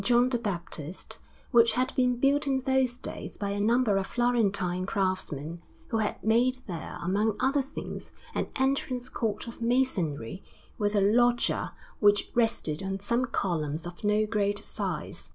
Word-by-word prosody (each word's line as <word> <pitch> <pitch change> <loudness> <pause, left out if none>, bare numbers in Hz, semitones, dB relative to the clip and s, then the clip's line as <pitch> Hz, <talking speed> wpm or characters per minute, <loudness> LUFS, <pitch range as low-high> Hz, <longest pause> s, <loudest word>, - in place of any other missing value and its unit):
John 245 +3 +4
the 245 -2 0
Baptist, 175 -5 -5 0.3
which 235 -2 +6
had 255 +1 0
been 250 -1 +3
built 280 +3 +2
in 270 -1 +2
those 265 -1 +1
days - - -7
by 200 -1 -2
a 200 - -2
number 225 -1 +3
of 195 - -1
Florentine 200 -7 +1
craftsmen, 175 -5 -2 0.3
who 225 - 0
had 215 - -2
made 240 +4 +3
there, 170 -4 -6
among 205 +4 +1
other 275 +2 +2
things, 270 - -7 0.2
an - - -1
entrance 265 -2 0
court 220 -3 -2
of 230 - -9
masonry 195 - 0 0.4
with 205 0 +1
a 200 - +4
loggia 240 +4 +2 0.2
which 205 -1 +4
rested 225 -10 +1
on 195 0 -3
some 235 +6 +1
columns 165 - -2
of 175 +3 -9
no 210 +1 +3
great 205 -1 0
size. - - -3
215 Hz, 155 wpm, -28 LUFS, 190-245 Hz, 0.4 s, which